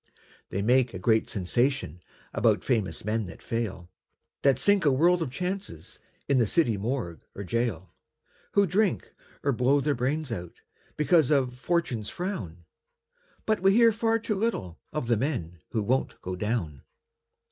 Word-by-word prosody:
They 100 - -2
make 125 -1 +3
a - - -3
great 110 +4 +2
sensation 105 - -1 0.3
About - - +2
famous 110 -6 -1
men 110 -1 -1
that 80 - -11
fail, 95 -7 -4 0.5
That 135 -3 +4
sink 200 +7 +3
a 145 - +4
world 170 +6 +3
of 160 - -1
chances 180 - -5 0.3
In 140 -2 +3
the 115 - +3
city 120 -4 +2
morgue 100 - -3
or 100 - -5
gaol, 115 -3 -2 0.6
Who 200 - +5
drink, 195 +2 0 0.3
or 140 - +2
blow 130 +3 +3
their 145 +1 +1
brains 135 +3 -1
out, 90 -6 -6 0.4
Because 155 -2 +4
of 130 -4 +1
"Fortune's 135 -10 -1
frown". 95 - -5 0.8
But 215 -1 +1
we 195 +2 +4
hear 230 +1 +6
far 225 +1 +1
too 225 -1 -2
little 195 - -2
Of 150 -5 -2
the 115 -1 +2
men 90 - -3
who 110 -3 -1
won't 130 +6 0
go 90 0 -3
down. 90 - -2
125 Hz, 160 wpm, -27 LUFS, 100-165 Hz, 0.8 s, hear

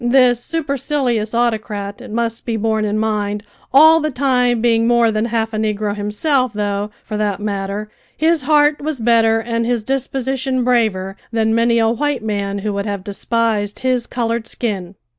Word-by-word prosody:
This 245 -1 +4
supercilious 275 -7 -1
autocrat, 215 -4 -1
it - - -10
must 230 +1 -2
be 230 -2 -2
borne 220 0 0
in 210 0 -1
mind, 210 -1 -1 0.3
all 315 +4 +7
the 310 -1 -1
time 250 -3 +1
being 230 0 +2
more 235 -1 +4
than 215 +1 0
half 225 -1 -1
a - - -2
negro 210 -1 -1
himself, 235 +5 0
though, 205 0 -2
for 215 - -5
that 205 -2 -1
matter, 200 0 -3 0.3
his 320 0 +2
heart 295 +1 +3
was 300 -2 -3
better 225 -1 +3
and 230 0 -2
his 235 -1 0
disposition 265 0 -1
braver 215 -6 +1
than 220 -1 +1
many 230 +1 +3
a 225 -1 +3
white 265 +1 -1
man 200 -2 -2
who 210 - 0
would 200 +1 -3
have 200 -2 -3
despised 210 0 -1
his 250 -2 +1
coloured 235 -1 -2
skin. 200 -7 -3
230 Hz, 170 wpm, -18 LUFS, 210-250 Hz, 0.3 s, all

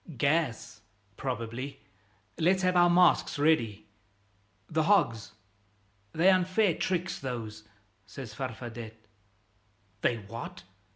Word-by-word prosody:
"Gas, 140 -7 0 0.3
probably. 125 +1 -4 0.6
Let's 185 +3 +3
have 185 0 +2
our 175 0 +6
masks 175 -3 +4
ready." 115 -9 +1 0.8
"The 160 0 0
hogs!" 140 - +2 0.8
"They're 180 - +5
unfair 185 +1 +2
tricks, 180 +2 -2
those," 110 -5 -6 0.4
says 125 -6 -8
Farfadet. 115 -2 -6 1.1
"They're 115 -2 +1
what?" 115 -1 -8
135 Hz, 95 wpm, -29 LUFS, 115-175 Hz, 1.1 s, our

